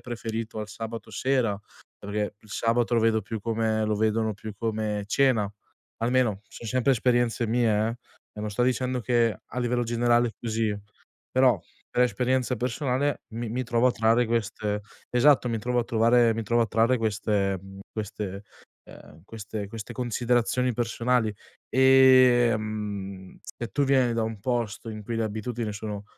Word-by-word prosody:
preferito 115 -2 -5
al 105 - -6
sabato 115 +1 -7
sera, 125 -6 0 0.4
perché 105 0 -3
il 110 - -21
sabato 115 +2 +1
lo 115 - +3
vedo 110 -1 +3
più 110 +1 -5
come 110 0 0
lo 105 -1 0
vedono 110 0 +1
più 110 +2 -8
come 110 -2 -2
cena, 115 -5 +2 0.5
almeno 115 -4 +1
son 115 - -10
sempre 130 +3 +2
esperienze 120 -1 +1
mie 115 0 +2
eh, 105 - +2 0.5
no 105 - -7
non 105 - -3
sto 105 +4 0
dicendo 130 0 0
che 115 -2 +2
a - - -6
livello 120 0 0
generale 120 0 +2
è - - -6
così, 110 -2 -1 0.5
però 130 -4 +4 0.3
per 125 - +2
esperienza 125 +2 +1
personale 130 +4 -1
mi 115 0 -4
mi 125 +3 -2
trovo 120 +1 +2
a 125 - +3
trarre 115 +1 +3
queste 105 -2 -2 0.3
esatto 125 0 +4
mi 115 - -1
trovo 125 +3 -1
a - - -3
trovare 115 0 +3
mi 115 - -2
trovo 120 +2 +1
a - - 0
trarre 115 +4 +2
queste, 105 -3 0
mhmm, 95 +1 -12
queste, 100 -2 -5 0.4
ehm, 75 +2 -15
queste 105 -1 -6
queste 110 0 -8
considerazioni 125 0 0
personali, 115 -1 0 0.4
ehm, 115 -7 +3
se 120 - -7
tu 145 - +2
vieni 130 -3 +3
da 115 - 0
un 110 -1 -3
posto 115 -1 -2
in 110 -1 -7
cui 115 +2 -4
le 115 - 0
abitudini 110 +1 -3
sono 105 0 -6
115 Hz, 165 wpm, -26 LUFS, 110-125 Hz, 0.5 s, però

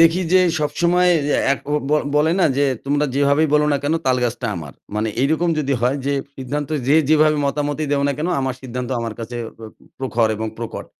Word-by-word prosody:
দেখি 165 +2 +5
যে 185 - +7 0.2
সবসময় 175 +4 +2 0.2
যে, - - +2 0.2
একো 140 - -5 0.2
ব - - +2 0.2
বলে 160 +2 +3
না - - +5
যে, 145 - +3 0.2
"তোমরা 145 +1 +1
যেভাবেই 140 +2 +3
বলো 150 0 +4
না - - +3
কেন, 150 +3 0
তালগাছটা 125 -1 0
আমার" 75 -4 -7 0.2
মানে 110 +1 0
এইরকম 160 +5 +1
যদি 140 -2 0
হয় 125 +3 +1
যে, 140 - +1 0.2
"সিদ্ধান্ত 140 +2 -4 0.2
যে 145 - +5
যেভাবে 155 -1 +4
মতামতই 145 +1 -2
দেও 140 -1 +1
না - - +1
কেন, 165 +4 -1
আমার 130 -1 -1
সিদ্ধান্ত 125 0 -5
আমার 115 -2 -4
কাছে 120 +2 -6 0.2
প - - -18 0.4
প্রখর 115 -3 +1
এবং 110 +1 -3
প্রকট।" 115 -1 -6
140 Hz, 195 wpm, -20 LUFS, 125-155 Hz, 0.4 s, যে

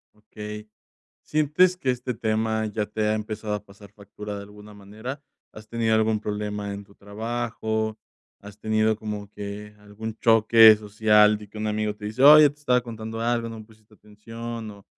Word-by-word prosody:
Okey, 105 0 -9 0.5
¿sientes 155 +5 +2
que 135 - -2
este 125 0 -4
tema 110 0 -1
ya 105 0 -2
te 105 +1 -5
ha 105 - +2
empezado 110 0 -4
a 105 -1 -4
pasar 100 0 -16
factura 105 0 -9
de 100 - -7
alguna 105 +1 -14
manera? 110 +7 -8 0.3
¿Has 110 0 -13
tenido 115 -1 0
algún 110 0 +2
problema 105 -1 -4
en 100 0 -7
tu 100 0 -21
trabajo? 110 +1 -3 0.4
¿Has 100 0 -13
tenido 110 0 +1
como 105 -1 -6
que 105 +1 -8
algún 105 +2 -8
choque 110 -1 +7
social 105 0 +3
de 105 -1 -13
que 110 - -12
un 110 0 -2
amigo 105 0 -1
te 105 - -10
dice: 110 +5 -2
"Oye, 150 +1 +9
te 145 +1 -16
estaba 125 -4 +2
contando 115 -1 -7
algo, 115 0 0
no 115 -1 -8
me 110 - -11
pusiste 110 -1 -23
atención", 115 +2 -8
o 100 -1 -16
110 Hz, 180 wpm, -24 LUFS, 105-115 Hz, 0.5 s, Oye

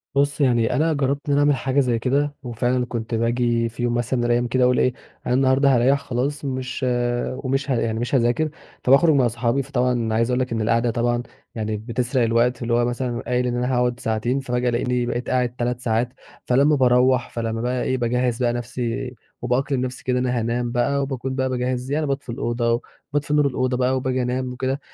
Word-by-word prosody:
بُص، 140 +1 +1
يعني 120 -4 +2
أنا 160 +4 +2
جرّبت 140 -1 0
إن 145 - +1
أنا 140 - +3
أعمل 145 0 +4
حاجة 135 +1 0
زي 125 -4 +1
كده 145 +4 0
وفعلًا 125 +1 0
كنت 115 -1 -4
باجي 115 0 +1
في 120 +2 -6
يوم 120 -1 +1
مثلًا 120 +1 -1
من 120 - 0
الأيام 120 0 +2
كده 125 +2 +1
أقول 125 0 +3
إيه، 130 - +2 0.3
أنا 125 - 0
النهاردة 135 +1 +4
هاريّح 130 +4 +3
خلاص 140 +2 -2
مش 130 -1 -3 0.5
ومش 135 +1 -2
ه - - +3
يعني 110 -1 -1
مش 120 +4 -1
هاذاكر، 125 +5 +2 0.3
فباخرُج 140 +5 +5
مع 130 -3 +4
صحابي، 120 +3 0
فطبعًا 125 -4 0
عايز 115 +2 +1
أقول 125 0 +1
لك 125 -1 -2
إن 115 -1 -1
القعدة 115 +2 +2
طبعًا 120 +1 0 0.3
يعني 110 -1 -2
بتسرق 120 +3 -1
الوقت 115 +2 +2
اللي 120 0 -1
هو 120 0 +3
مثلًا 120 0 -2
قايل 125 +1 0
إن 120 - -1
أنا 125 +1 0
هاقعُد 125 0 +1
ساعتين، 115 +4 -1
فباجي 125 -2 -1
ألاقيني 120 +1 0
بقيت 120 0 -3
قاعد 125 -1 0
3 120 0 -2
ساعات، 120 +1 -1 0.3
فلمّا 140 +4 +4
باروّح 125 -1 +3
فلمّا 115 -1 -3
بقى 125 +1 -1
إيه، 130 - 0
باجهِّز 125 0 0
بقى 120 -1 +2
نَفْسي 120 +1 -4 0.3
وبأقلم 125 +2 0
نَفْسي 130 0 -5
كده 125 0 0
أنا 125 -1 0
هانام 120 +1 -1
بقى 140 +3 +1
وباكون 135 -1 -3
بقى 130 0 0
باجهّز 125 +1 -2
يعني 155 +1 0
باطفي 140 -2 -3
الأوضة 120 0 0 0.3
وباطفي 145 0 -1
نور 150 -1 +4
الأوضة 130 -1 -1
بقى 130 +1 +1
وباجي 130 0 -1
أنام 125 +1 -2
وكده، 130 +2 -2
125 Hz, 205 wpm, -22 LUFS, 120-130 Hz, 0.5 s, فباخرُج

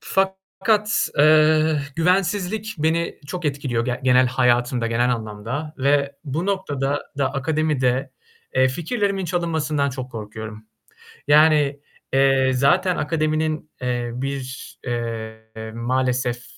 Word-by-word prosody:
Fakat, 195 +3 0
eee, 155 0 +5 0.2
güvensizlik 195 +5 0
beni 160 +2 0
çok 180 +3 -5
etkiliyor 140 -5 -1
ge 125 0 -2
genel 130 0 +5
hayatımda, 125 -1 +1
genel 120 +2 +1
anlamda 115 +8 -5
ve 140 +1 +1
bu 155 +6 -2
noktada 145 -8 -1 0.2
da 135 -1 +1
akademide, 140 -3 0 0.4
eee, 130 0 +4
fikirlerimin 195 - -1
çalınmasından 160 -4 0
çok 130 -1 -6
korkuyorum. 110 -1 -8 0.6
Yani, 150 -2 +5 0.3
eee, 135 -1 +4
zaten 175 +8 +3
akademinin, 155 0 -1
eee, 120 -1 -1
bir, 135 0 -5
eee, 110 -2 -5
maalesef 125 0 -1
140 Hz, 105 wpm, -22 LUFS, 125-160 Hz, 0.6 s, eee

